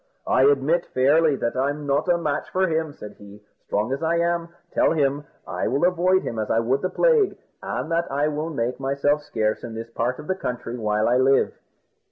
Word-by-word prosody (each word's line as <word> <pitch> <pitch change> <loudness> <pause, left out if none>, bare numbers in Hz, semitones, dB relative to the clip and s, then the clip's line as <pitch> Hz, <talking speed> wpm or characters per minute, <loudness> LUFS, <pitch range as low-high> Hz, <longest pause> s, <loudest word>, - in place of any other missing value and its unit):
"I 130 - +2
admit 145 +5 +3
fairly 145 +4 +4
that 120 -2 -2
I'm 145 +3 -1
not 145 +5 0
a 175 - +4
match 150 -3 -2
for 185 0 +1
him," 160 -2 -1
said 105 -7 -10
he, 100 0 -13 0.3
"strong 110 +5 -1
as 140 - -4
I 165 +1 +1
am; 170 0 0 0.2
tell - - +3
him 145 -1 0 0.2
I - - -3
will 140 +6 +1
avoid 180 +1 +2
him 115 - -4
as 110 - -3
I 115 - +2
would 130 +4 0
the 185 - -1
plague, 455 - +2 0.2
and 160 - -4
that 170 -1 0
I 145 +2 +1
will 155 +2 -2
make 125 -4 -2
myself 140 +2 +1
scarce 110 -7 -2
in 115 -2 -7
this 115 +1 -7
part 120 +2 -1
of - - -9
the 190 - 0
country 125 -8 -5
while 105 -2 0
I 125 - +3
live." 135 +1 +3
140 Hz, 215 wpm, -23 LUFS, 125-165 Hz, 0.3 s, fairly